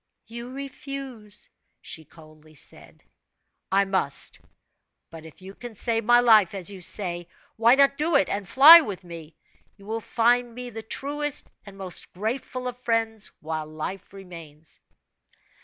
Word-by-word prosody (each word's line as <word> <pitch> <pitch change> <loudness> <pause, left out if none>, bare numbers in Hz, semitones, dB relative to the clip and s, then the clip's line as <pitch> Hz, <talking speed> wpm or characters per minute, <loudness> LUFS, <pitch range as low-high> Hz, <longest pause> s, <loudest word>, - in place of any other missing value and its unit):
"You 235 +1 -8
refuse?" 270 -5 -8 0.3
she 160 - -7
coldly 155 -1 -18
said. - - -7 0.7
"I 200 +1 +3
must! 190 -8 0 0.7
But 160 -1 -11
if 160 +3 -15
you 190 +1 -10
can 240 +1 -10
save 230 +1 +1
my 240 +1 +6
life, 215 -6 +5
as 195 0 -1
you 190 -2 -10
say, 175 -2 -1 0.3
why 230 +3 +5
not 275 0 +3
do 315 +1 +1
it, 195 - +4
and 200 -1 -4
fly 315 +6 +10
with 200 - -6
me? 165 -3 -11 0.4
You 200 - -17
will 225 +2 -4
find 240 +1 +1
me 250 0 -7
the 225 0 -7
truest 290 +5 -2 0.2
and 195 -1 -12
most 190 -2 -5
grateful 250 +5 -4
of 250 0 -6
friends, 225 -3 -1
while 155 0 -4
life 155 +5 -7
remains." 165 -6 -12
210 Hz, 150 wpm, -25 LUFS, 175-245 Hz, 0.7 s, fly